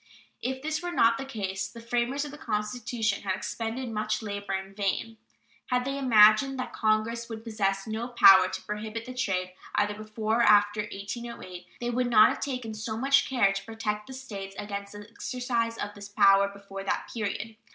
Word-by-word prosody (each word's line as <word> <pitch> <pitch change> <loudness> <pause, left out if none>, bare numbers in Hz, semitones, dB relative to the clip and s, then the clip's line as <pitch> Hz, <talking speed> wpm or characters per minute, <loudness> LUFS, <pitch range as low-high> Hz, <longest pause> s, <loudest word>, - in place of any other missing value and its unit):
If 260 +2 -3
this 310 +1 -1
were 350 0 -3
not 230 -8 +3
the 270 - -4
case, 195 -6 -3
the 230 - -12
framers 240 +4 -1
of 290 - -7
the 295 - -10
Constitution 215 -2 -2
had 190 -2 -1
expended 230 +6 -4
much 215 0 -2
labor 205 -2 -4
in 190 0 -4
vain. 210 +3 -2 0.5
Had 250 -1 0
they 275 +1 -2
imagined 245 +2 +6
that 255 - -4
Congress 225 +2 0
would 220 -1 -7
possess 195 -4 -1
no 220 +2 -3
power 195 -6 +7
to 190 0 -5
prohibit 215 +2 -5
the 255 - -7
trade 185 -7 -1 0.2
either 205 0 +2
before 215 +1 -2
or - - +5
after 205 -1 +5
1808, 200 -3 -7
they 240 0 -2
would 250 +1 0
not 215 -2 +7
have - - -3
taken 250 -5 -4
so 220 +1 -4
much 275 +3 +3
care 220 -7 +3
to 195 - -4
protect 215 -2 -4
the 265 - -8
States 200 -7 -7
against 200 -1 -5
the 205 0 -10
exercise 230 0 -2
of 205 0 -4
this 205 0 -10
power 200 -1 +5
before 200 -1 -9
that 195 - -2
period. 220 0 -3
220 Hz, 190 wpm, -28 LUFS, 205-240 Hz, 0.5 s, power